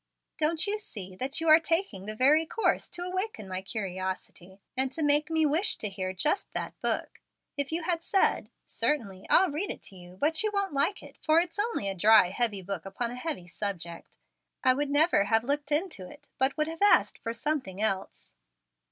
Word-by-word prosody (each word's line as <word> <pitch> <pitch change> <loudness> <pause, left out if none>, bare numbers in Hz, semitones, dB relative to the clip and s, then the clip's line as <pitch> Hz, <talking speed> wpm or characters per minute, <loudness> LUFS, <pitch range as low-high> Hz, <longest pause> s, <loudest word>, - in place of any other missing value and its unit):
"Don't 320 +1 +2
you 420 +1 -1
see 190 - -7
that 270 +5 -2
you 325 - -2
are 310 +1 +8
taking 330 - -1
the 215 - -4
very 285 +7 +4
course 450 - 0
to 350 - -3
awaken 370 - -4
my 185 0 -4
curiosity, 190 -2 -5 0.2
and 260 0 +1
to 320 - -3
make 295 +1 +3
me 320 -1 +2
wish 320 +9 +2
to 210 - -3
hear 185 -1 -4
just 300 - -1
that - - -4
book? - - -2 0.3
If 285 0 -2
you 330 +1 -1
had 335 0 -1
said, 385 +3 +1 0.2
'Certainly, 200 -10 -2
I'll 370 -2 +5
read 335 +8 -2
it - - -6
to 195 - -8
you, 180 0 -13
but 315 +8 +2
you 430 - +1
won't 400 -5 0
like 285 +9 0
it, - - -14
for 315 +1 +5
it's 345 +3 -3
only 425 - -1
a 195 - -1
dry, 195 -1 +5
heavy 210 -3 0
book 195 -1 -5
upon 235 +5 -3
a - - -6
heavy 250 - -4
subject,' 175 -2 -6 0.5
I 255 - +5
would 285 +2 -2
never 290 - +3
have 225 +2 +2
looked 285 +3 -2
into 295 - -1
it, - - -16
but 265 +2 +2
would 305 0 +1
have 325 +2 -7
asked 410 - +4
for 230 - -4
something 255 -7 -2
else." 195 -3 -2
280 Hz, 205 wpm, -28 LUFS, 195-325 Hz, 0.5 s, are